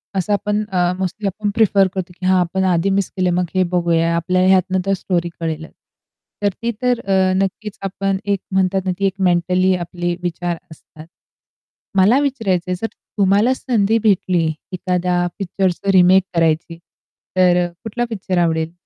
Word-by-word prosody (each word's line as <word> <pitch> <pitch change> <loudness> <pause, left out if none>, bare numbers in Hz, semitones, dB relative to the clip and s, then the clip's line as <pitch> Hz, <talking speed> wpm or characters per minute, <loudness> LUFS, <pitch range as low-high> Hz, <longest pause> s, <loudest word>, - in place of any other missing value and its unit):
असं 190 +2 0
आपण 210 +1 0
अ, 180 -1 +2
मोस्टली 190 +2 -2
आपण 205 +2 -2
प्रिफर 200 -3 +4
करतो 185 -1 -5
की 185 - -5
हां, 185 0 +4
आपण 180 +2 0
आधी 170 +3 +1
मिस 195 0 0
केलं 185 -2 0
मग 180 0 +1
हे 185 - +4
बघूया, 170 -1 +2
आपल्याला 180 +2 +1
ह्यातनं 190 0 +3
तर 195 - +1
स्टोरी 175 -2 -1
कळेलच. 160 -1 -4 0.7
तर 205 - +4
ती 235 0 0
तर 250 -1 +1
अ, 190 -1 +1
नक्कीच 210 +2 -5
आपण 195 0 -2
एक 200 -1 0
म्हणतात 190 0 +1
ना, 185 - +1
ती 200 - +1
एक 195 - +1 0.2
मेंटली 180 +2 +2
आपले 175 0 -3
विचार 175 0 -2
असतात. 155 0 -14 0.9
मला 205 +8 +5
विचारायचंय 195 -11 -1
जर 225 - 0 0.3
तुम्हाला 205 +5 +3
संधी 225 -5 +1
भेटली, 185 -5 +2 0.3
एखाद्या 180 -1 0
पिक्चरचं 190 0 -1
रिमेक 185 0 +5
करायची 165 0 0 0.6
तर 180 -1 +4
अ, - - -2 0.2
कुठला 240 +2 -2
पिक्चर 190 -4 -3
आवडेल? 165 -1 +1
185 Hz, 160 wpm, -19 LUFS, 175-195 Hz, 0.9 s, मला